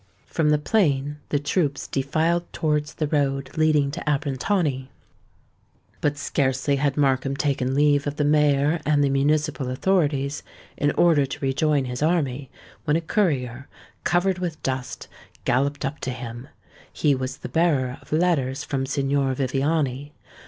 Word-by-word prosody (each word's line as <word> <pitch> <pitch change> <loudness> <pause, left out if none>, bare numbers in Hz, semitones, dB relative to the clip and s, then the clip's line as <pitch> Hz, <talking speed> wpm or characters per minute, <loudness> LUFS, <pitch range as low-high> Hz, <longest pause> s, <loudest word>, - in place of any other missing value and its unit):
From 155 -2 0
the 150 - +4
plain 145 -4 +1
the 145 - +1
troops 145 -1 -1
defiled 160 +5 0
towards 150 -1 -1
the 155 - -1
road 135 -2 -1
leading 155 -3 +3
to 170 - -5
Abrantani. 140 0 0 1.1
But 145 0 0
scarcely 140 0 0
had 140 0 0
Markham 135 -1 +1
taken 135 -3 0
leave 145 0 +3
of 145 - -2
the 150 - 0
mayor 150 +1 +3
and 145 -1 +2
the 140 - +2
municipal 145 0 +1
authorities, 145 -2 0 0.3
in 145 - +1
order 155 -5 +4
to 135 - -6
rejoin 140 +1 +1
his 125 +1 -5
army, 145 -5 0 0.4
when 150 -1 +2
a 165 - +1
courier, 140 - -1 0.4
covered 180 +1 +1
with 170 -4 -4
dust, 130 -1 -4 0.4
galloped 140 +4 +1
up 140 +2 -4
to - - -4
him. 120 0 -7 0.4
He 150 -2 +2
was 130 +1 -3
the - - -8
bearer 140 -7 +1
of - - -20
letters 150 -5 +1
from 135 -1 -2
Signor 140 -1 0
Viviani. 140 +1 -1
145 Hz, 145 wpm, -24 LUFS, 135-155 Hz, 1.1 s, the